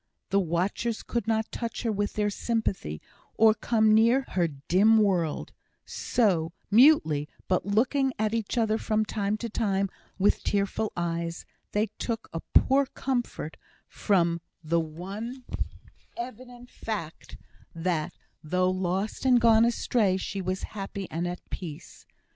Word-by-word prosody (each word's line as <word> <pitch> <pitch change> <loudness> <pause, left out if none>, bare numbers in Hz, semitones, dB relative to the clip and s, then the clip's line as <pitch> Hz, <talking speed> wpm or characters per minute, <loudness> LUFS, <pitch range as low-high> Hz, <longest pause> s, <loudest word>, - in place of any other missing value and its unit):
The 200 - +4
watchers 190 +6 -1
could 235 -3 -3
not 220 0 0
touch 235 0 -4
her 230 - +1
with 205 0 -1
their 210 -1 0
sympathy, 200 - -2 0.3
or 220 0 +6
come 220 0 +2
near 230 +5 +5
her 175 -2 +1
in - - -1
her 135 - -18
dim 210 +5 +5
world; 185 -7 +1 0.3
so, 170 -8 +1 0.2
mutely, 200 - +5 0.2
but 185 0 +1
looking 260 +6 +2
at 215 0 0
each 230 +1 -2
other 220 -1 +2
from 215 0 +1
time 210 0 -1
to 235 - -4
time 200 -4 0 0.3
with 200 +1 +2
tearful 205 +2 0
eyes, 170 0 -2 0.3
they 210 +1 +2
took 230 -2 -3
a 165 - -2 0.2
poor 270 +1 +5
comfort 245 - -3 0.3
from 170 -4 +1 0.2
the 165 +2 +2
one 195 +11 -6 0.7
evident 245 0 -8
fact 185 -8 -6 0.4
that, 165 -2 -1 0.3
though 185 +4 +1
lost 185 +3 -2
and 255 -2 +5
gone 230 -1 +6
astray, 230 -4 +2
she 195 +1 -4
was 185 +1 -3
happy 195 -2 -5
and 170 +2 -2
at 175 0 -6
peace. 160 -6 -8
205 Hz, 140 wpm, -27 LUFS, 180-230 Hz, 0.7 s, or